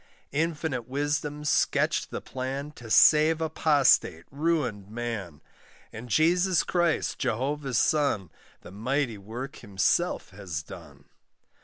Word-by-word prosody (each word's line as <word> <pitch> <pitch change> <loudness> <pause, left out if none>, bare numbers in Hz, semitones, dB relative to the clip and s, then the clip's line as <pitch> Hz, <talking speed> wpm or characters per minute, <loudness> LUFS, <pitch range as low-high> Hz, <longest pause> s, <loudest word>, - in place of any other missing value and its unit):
Infinite 155 -5 -2
wisdom 145 +2 -2
sketched 150 - +1
the - - -5
plan 135 +3 -5
To 120 -6 -12
save 155 +7 +6
apostate, 150 - +2
ruined 140 -10 -1
man; 110 -9 -5 0.5
And 120 +3 -8
Jesus 175 - +3
Christ, 175 -2 0
Jehovah's 135 +1 -1
son, 140 - +1 0.3
The - - -12
mighty 115 +2 -2
work 120 +7 -7
Himself 110 - 0
has 95 -6 -6
done. - - -13
135 Hz, 110 wpm, -27 LUFS, 110-155 Hz, 0.5 s, save